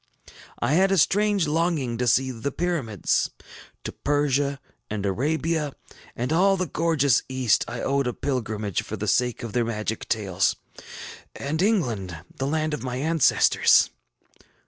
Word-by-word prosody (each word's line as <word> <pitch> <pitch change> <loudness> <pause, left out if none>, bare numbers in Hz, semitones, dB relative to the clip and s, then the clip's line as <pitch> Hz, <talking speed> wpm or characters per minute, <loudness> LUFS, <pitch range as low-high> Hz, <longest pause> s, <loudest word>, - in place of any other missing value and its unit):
I 145 - 0
had 190 +4 +4
a 195 - +3
strange 205 +2 +3
longing 155 -6 0
to 125 - 0
see 130 +2 +3
the 125 +4 -4
Pyramids. 140 - 0 0.5
To - - -4
Persia 140 -1 0 0.3
and 105 -1 -3
Arabia, 150 - -1 0.4
and 125 +6 -2
all 195 +3 +4
the 185 - -1
gorgeous 150 -5 +2
East, 130 -4 +2
I 120 0 -5
owed 140 -1 0
a 125 - -1
pilgrimage 110 - -2
for 110 - -6
the 105 +2 -4
sake 125 +2 +1
of 115 - -6
their 120 - +2
magic 110 -1 -4
tales. 95 -4 +1 0.8
And 155 +4 -2
England, 120 - 0 0.2
the 135 - -2
land 155 +1 -1
of 150 - -3
my 125 -1 -4
ancestors! 155 +2 +4
135 Hz, 145 wpm, -25 LUFS, 115-160 Hz, 0.8 s, had